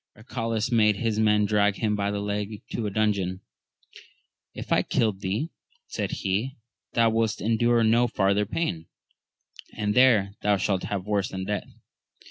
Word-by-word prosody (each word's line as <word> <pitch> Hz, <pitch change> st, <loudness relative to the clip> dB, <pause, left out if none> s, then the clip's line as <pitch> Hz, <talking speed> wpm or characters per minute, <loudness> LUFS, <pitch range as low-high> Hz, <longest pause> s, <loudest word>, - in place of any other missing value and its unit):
Arcalaus 115 Hz, 0 st, -3 dB
made 105 Hz, -3 st, +4 dB
his 110 Hz, 0 st, -1 dB
men 105 Hz, -1 st, +3 dB
drag 105 Hz, -1 st, +2 dB
him 105 Hz, -1 st, 0 dB
by 100 Hz, 0 st, -1 dB
the 100 Hz, 0 st, -2 dB
leg 105 Hz, +1 st, -4 dB
to 110 Hz, -, -2 dB
a -, -, -1 dB
dungeon; 100 Hz, -3 st, 0 dB, 1.1 s
If -, -, -8 dB
I -, -, +4 dB
killed 105 Hz, -4 st, 0 dB
thee, 105 Hz, -, -2 dB, 0.3 s
said -, -, -3 dB
he, 105 Hz, +8 st, -2 dB, 0.4 s
thou 115 Hz, -1 st, +3 dB
wouldst 110 Hz, -1 st, 0 dB
endure 115 Hz, +1 st, +2 dB
no 115 Hz, +2 st, +4 dB
farther 100 Hz, -1 st, +1 dB
pain, 85 Hz, -, -2 dB, 0.9 s
and 105 Hz, -1 st, 0 dB
there 115 Hz, -6 st, +4 dB
thou 105 Hz, -1 st, +2 dB
shalt 95 Hz, 0 st, -1 dB
have 95 Hz, -2 st, -3 dB
worse 105 Hz, -2 st, 0 dB
than 95 Hz, 0 st, -5 dB
death. 105 Hz, +1 st, -3 dB
105 Hz, 155 wpm, -26 LUFS, 100-115 Hz, 1.1 s, made